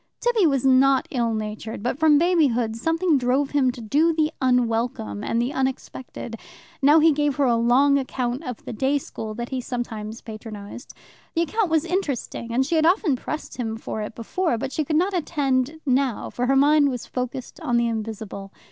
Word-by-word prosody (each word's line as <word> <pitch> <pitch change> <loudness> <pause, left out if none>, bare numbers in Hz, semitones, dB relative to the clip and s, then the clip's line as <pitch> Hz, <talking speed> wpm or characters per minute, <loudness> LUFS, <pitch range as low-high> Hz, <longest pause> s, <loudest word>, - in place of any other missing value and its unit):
Tibby 465 -7 +3
was 275 -3 +1
not 265 0 +4
ill 235 -3 0
natured, 215 0 -5
but 250 +3 -2
from 310 -2 +5
babyhood 285 -10 +2
something 325 +4 +1
drove 260 +3 +1
him 270 -3 +2
to 245 -1 -10
do 295 +10 +2
the 310 -1 +1
unwelcome 230 - 0
and 230 - 0
the 245 +4 -1
unexpected. 260 -3 -4 0.4
Now 290 +3 +6
he 320 +1 +5
gave 295 -1 0
her 285 - +1
a 240 -2 +3
long 260 +5 +4
account 255 +1 -3
of 250 -6 -7
the - - -5
day 270 +6 +1
school 220 -5 -6
that 240 +1 -5
he 260 -2 -3
sometimes 230 -3 -5
patronized. 215 0 -9 0.4
The 335 - +3
account 410 +3 0
was 320 0 +2
interesting, 295 -9 -3
and 260 +3 +2
she 335 - -3
had 315 - +3
often 350 -5 +3
pressed 305 +4 -6
him 225 -3 -3
for 220 -1 -5
it 210 +1 -6
before, 245 +4 -1
but 255 - -4
she 310 - -1
could 305 +2 -2
not 365 +5 +2
attend 290 -4 0
now, 260 -3 0
for 250 +1 -2
her 270 - +3
mind 290 +1 +5
was 250 -4 -4
focussed 250 0 -5
on 240 - 0
the 235 - +2
invisible. 220 -3 -5
260 Hz, 190 wpm, -23 LUFS, 235-295 Hz, 0.4 s, Now